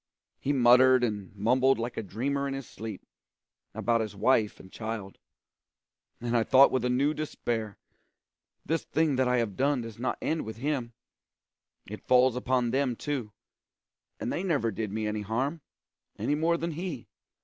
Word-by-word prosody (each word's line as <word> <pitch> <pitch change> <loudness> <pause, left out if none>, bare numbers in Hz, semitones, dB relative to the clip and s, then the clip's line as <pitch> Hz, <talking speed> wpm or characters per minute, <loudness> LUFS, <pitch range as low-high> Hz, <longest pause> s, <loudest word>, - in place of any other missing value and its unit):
He 140 - -1
muttered 130 -1 +6
and 105 -5 -2
mumbled 130 +6 +3
like 115 +1 -4
a - - -2
dreamer 135 +8 -2
in 135 - -3
his 135 -3 -6
sleep, 110 -3 -8 0.7
about 115 -1 +1
his 110 -2 -4
wife 110 0 +2
and 95 - -14
child; 110 -3 -6 1.0
and 120 0 -2
I 115 - +4
thought 130 +4 +6
with 130 -2 0
a 125 - +1
new 140 +4 +2
despair, 115 -9 -3 0.9
'This 165 0 0
thing 155 -3 +1
that 130 -1 +2
I 125 0 +2
have 115 -5 -1
done 140 -1 +1
does 115 -1 -9
not 130 - -1
end 160 0 -1
with 110 0 -7
him; 130 -2 -2 0.9
it 105 +2 -10
falls 125 -1 +5
upon 125 -1 0
them 135 -1 +1
too, 130 -5 -4 0.9
and - - -2
they - - -1
never 150 -12 0
did 105 0 -4
me 110 +1 -2
any 105 0 -2
harm, 130 +10 -2 0.6
any - - 0
more 165 +3 +2
than 170 +1 -3
he.' 160 -5 -5
125 Hz, 170 wpm, -28 LUFS, 110-140 Hz, 1.0 s, muttered